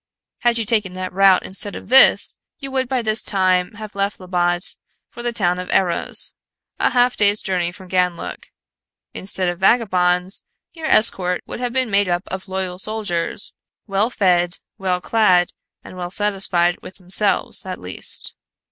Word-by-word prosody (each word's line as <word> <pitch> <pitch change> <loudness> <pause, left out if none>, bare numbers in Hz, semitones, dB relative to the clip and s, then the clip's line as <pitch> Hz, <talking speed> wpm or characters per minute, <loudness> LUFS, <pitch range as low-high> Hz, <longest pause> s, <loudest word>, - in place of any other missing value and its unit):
Had 240 -1 +2
you 225 - -1
taken 210 -4 0
that 185 0 -5
route 195 0 +5
instead 200 +2 -2
of - - -10
this, 265 +2 +6 0.2
you 275 -1 -8
would 260 -1 -1
by 255 -2 -1
this 215 0 +1
time 185 0 +1
have 215 0 -9
left 200 +1 -2
Labbot 175 -1 0 0.4
for 240 - -9
the 240 0 -2
town 180 -5 +1
of 180 - -6
Erros, 180 -3 +1 0.5
a - - +3
half 245 0 +2
day's 205 0 +3
journey 180 -3 -1
from 185 +1 -14
Ganlook. 180 -2 -2 0.7
Instead 190 -1 +2
of 175 0 -3
vagabonds, 185 -3 +2 0.3
your 320 -2 -5
escort 180 - +2
would - - -7
have 245 -1 -2
been 260 -3 0
made 200 -1 +2
up 175 +1 0
of 190 +1 -6
loyal 185 -1 -4
soldiers, 200 -5 -1 0.3
well 205 +2 0
fed, 180 -5 +1 0.2
well 185 -2 0
clad, 185 -6 +3 0.3
and - - -11
well 175 -1 -5
satisfied 190 -3 +1
with 185 - -11
themselves, 195 +2 0
at 185 -1 -6
least." 90 +1 -2
190 Hz, 165 wpm, -20 LUFS, 180-215 Hz, 0.7 s, this